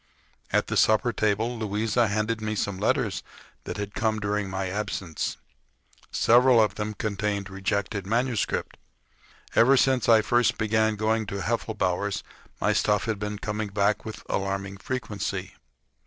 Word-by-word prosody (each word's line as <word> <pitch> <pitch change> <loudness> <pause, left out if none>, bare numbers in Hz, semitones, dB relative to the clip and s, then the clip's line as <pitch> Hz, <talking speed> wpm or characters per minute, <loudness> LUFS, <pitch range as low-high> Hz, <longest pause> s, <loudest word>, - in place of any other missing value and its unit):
At - - +2
the - - -2
supper 110 +2 +3
table 110 +3 0
Louisa 110 +2 +1
handed 110 +2 -1
me 110 0 -2
some 100 -2 -2
letters 110 -2 +1 0.4
that - - -5
had 100 0 -4
come 110 -1 0
during 105 -1 -1
my 95 0 -2
absence. 95 -4 -3 0.7
Several 125 +1 +5
of 105 -3 +3
them 105 0 -4
contained 100 -2 -2
rejected 95 0 -2
manuscript. 120 0 -1 0.8
Ever 135 +4 +6
since 130 -2 +3
I 110 -2 +6
first 120 +1 +2
began 110 0 +2
going 110 +1 0
to 100 0 -4
Heffelbower's 100 -4 -1 0.4
my - - +2
stuff 105 -1 +2
had 110 -3 -2
been 105 0 -3
coming 105 0 -3
back 100 +1 +1
with 110 - -8
alarming 100 0 -2
frequency. 110 -3 -4
105 Hz, 140 wpm, -26 LUFS, 100-110 Hz, 0.8 s, Ever